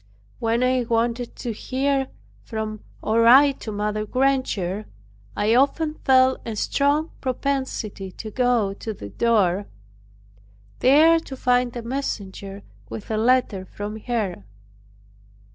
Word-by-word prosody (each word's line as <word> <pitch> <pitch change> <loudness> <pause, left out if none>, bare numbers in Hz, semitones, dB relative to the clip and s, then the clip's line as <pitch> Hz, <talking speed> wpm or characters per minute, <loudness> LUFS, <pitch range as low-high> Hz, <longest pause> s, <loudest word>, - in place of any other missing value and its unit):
When 230 +1 +1
I 255 0 +2
wanted 235 +1 -1
to 240 - -4
hear 270 +4 -1 0.4
from, 215 -2 -5 0.2
or 225 +1 +2
write 270 +4 +6
to 220 - -6
Mother 210 +1 -2
Granger, 215 -6 0 0.5
I 215 +2 +2
often 285 +5 +2
felt 260 -3 +3
a 225 - -5
strong 290 +8 +1
propensity 255 -7 -3
to 220 - -8
go 240 -5 +1
to 215 +2 -6
the 100 - -8
door. 200 - +1 1.1
There 315 +6 +6
to 270 -4 -9
find 250 -1 +1
a 240 - -5
messenger 200 -6 -5 0.3
with 215 - -7
a 215 - 0
letter 235 -4 +2
from 205 +3 -7
her. 215 - -3
235 Hz, 125 wpm, -23 LUFS, 210-260 Hz, 1.1 s, write